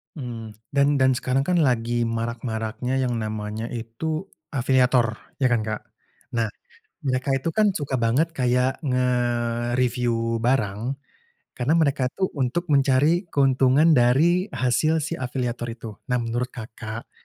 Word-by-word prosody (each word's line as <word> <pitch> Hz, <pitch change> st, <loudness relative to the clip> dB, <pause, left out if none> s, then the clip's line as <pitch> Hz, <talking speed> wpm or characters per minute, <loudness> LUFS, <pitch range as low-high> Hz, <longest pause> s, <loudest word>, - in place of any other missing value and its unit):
Mhm. 115 Hz, -6 st, -6 dB, 0.2 s
Dan 140 Hz, 0 st, +3 dB
dan 130 Hz, -1 st, +4 dB
sekarang 130 Hz, +1 st, 0 dB
kan 180 Hz, +5 st, +1 dB
lagi 120 Hz, -5 st, +2 dB
marak-maraknya 115 Hz, +2 st, -2 dB
yang 125 Hz, -2 st, 0 dB
namanya 110 Hz, 0 st, -4 dB
itu, 155 Hz, -, -4 dB, 0.2 s
afiliator, 125 Hz, -3 st, +2 dB, 0.2 s
ya 130 Hz, -, +4 dB
kan, 120 Hz, -2 st, +2 dB
Kak? 110 Hz, -1 st, -3 dB, 0.6 s
Nah, 115 Hz, -, +2 dB, 0.6 s
mereka 135 Hz, -2 st, -1 dB
itu 135 Hz, +4 st, 0 dB
kan, 210 Hz, +4 st, +3 dB
suka 145 Hz, -7 st, -2 dB
banget, 130 Hz, +8 st, +1 dB
kayak 125 Hz, 0 st, +2 dB
ngereviu 120 Hz, -2 st, 0 dB
barang, 115 Hz, -4 st, 0 dB, 0.8 s
karena 130 Hz, +5 st, +1 dB
mereka 140 Hz, -5 st, +2 dB
tuh 190 Hz, -1 st, 0 dB
untuk 140 Hz, +7 st, -1 dB
mencari 145 Hz, +6 st, +3 dB
keuntungan 135 Hz, +1 st, +4 dB
dari 155 Hz, +7 st, +4 dB
hasil 155 Hz, +6 st, +2 dB
si 165 Hz, +3 st, -3 dB
afiliator 125 Hz, -2 st, -3 dB
itu. 115 Hz, -1 st, -7 dB, 0.2 s
Nah, 125 Hz, -2 st, 0 dB
menurut 120 Hz, +3 st, -3 dB
Kakak, 110 Hz, -1 st, -7 dB
125 Hz, 130 wpm, -24 LUFS, 115-140 Hz, 0.8 s, dan